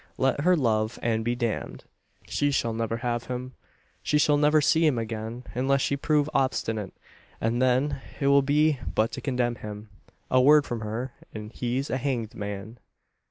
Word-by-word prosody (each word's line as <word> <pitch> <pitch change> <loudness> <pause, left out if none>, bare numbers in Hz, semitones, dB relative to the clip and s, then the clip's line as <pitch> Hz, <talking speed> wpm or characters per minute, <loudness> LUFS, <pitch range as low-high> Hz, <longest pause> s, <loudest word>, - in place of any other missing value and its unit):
Let 135 +2 +1
her 180 +4 +4
love 110 -4 +1
and 115 -1 +1
be 120 +1 0
damned! 120 -3 -3 0.4
She 145 - 0
shall 120 -5 0
never 115 0 -2
have 120 -1 -2
him. 125 +1 -5 0.5
She 150 - +1
shall 150 0 +4
never 150 +1 +4
see 160 +3 +3
him 150 -6 +3
again, 115 +1 -4
unless 135 +2 +1
she 140 - +1
prove 150 +1 +1
obstinate; 110 -7 -1 0.5
and 115 +2 0
then 130 +2 +2 0.2
it 140 - -1
will 140 0 +6
be 145 +1 +2 0.2
but 110 +2 +2
to - - -6
condemn 125 -3 -1
him. 105 0 -8 0.4
A 130 - +5
word 145 +2 +6
from 120 - -4
her, 115 +4 -4 0.2
and 105 0 -7
he's 125 +3 -2
a 130 - +1
hanged 120 -5 -2
man. 105 +3 -6
125 Hz, 175 wpm, -26 LUFS, 115-140 Hz, 0.5 s, will